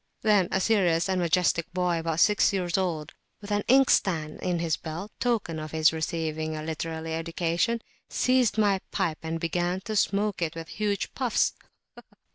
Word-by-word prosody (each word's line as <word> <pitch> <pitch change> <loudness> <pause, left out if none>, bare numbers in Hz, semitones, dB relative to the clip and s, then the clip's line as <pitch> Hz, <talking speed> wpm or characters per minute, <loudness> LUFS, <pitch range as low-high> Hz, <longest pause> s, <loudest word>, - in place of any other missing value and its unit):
Then 205 -5 +4
a 190 - +1
serious 180 -5 +2
and 190 -1 0
majestic 170 -1 +1
boy 180 -2 +1
about 165 0 -2
six 210 0 +4
years 180 -3 -1
old, 170 -5 -2 0.3
with 205 0 -9
an 205 0 +2
inkstand 190 - +3
in 180 -1 0
his 165 -2 0
belt, 170 +8 -7
in - - -44
token 220 -10 0
of 155 0 -6
his 160 0 +4
receiving 160 -1 -2
a 155 - -5
literary 160 0 -4
education, 170 +7 -1 0.3
seized 255 -4 +2
my 200 -3 +3
pipe 160 -2 -1
and 165 0 -3
began 175 +2 -1
to 215 +1 -5
smoke 205 -1 +1
it 165 -1 -1
with 165 -1 -7
huge 205 -2 -2
puffs. 250 -4 +1
175 Hz, 170 wpm, -27 LUFS, 160-205 Hz, 0.3 s, Then